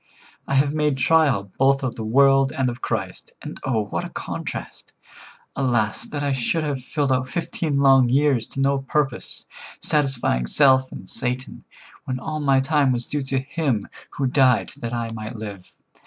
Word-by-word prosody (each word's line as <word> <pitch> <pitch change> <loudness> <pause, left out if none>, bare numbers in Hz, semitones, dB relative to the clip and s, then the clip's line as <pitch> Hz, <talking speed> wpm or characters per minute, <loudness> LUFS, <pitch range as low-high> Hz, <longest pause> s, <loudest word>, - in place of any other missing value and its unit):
I 140 - 0
have 140 +1 +3
made 150 -3 +1
trial 135 -8 +2
both 135 +1 +3
of 130 -3 -1
the 110 - -6
world 135 +4 +4
and 130 -2 0
of 120 +2 -10
Christ, 100 -5 -4
and - - -8
oh, 115 -5 0
what - - -3
a - - -6
contrast! - - -7 0.6
Alas! 120 -6 0
that 145 -1 -4
I 140 - 0
should 135 +5 0
have 140 -4 -3
filled 140 +1 -1
out 130 0 +1
fifteen 160 -2 -2
long 135 -3 +5
years 135 -3 +2
to - - -7
no 140 0 +2
purpose, 135 -2 -2 0.3
satisfying 135 - 0
self 130 - +4
and 95 - -9
Satan, 125 +2 -4 0.4
when 130 -1 -3
all 155 +3 -4
my 135 -2 +3
time 140 0 +2
was 120 -1 -1
due 145 - -2
to 135 0 -2
Him 135 -4 -1 0.2
who 140 - -3
died 130 -2 +3
that 115 -4 -5
I 115 -1 -3
might 110 +1 -6
live. 100 -4 -8
135 Hz, 175 wpm, -23 LUFS, 120-140 Hz, 0.6 s, long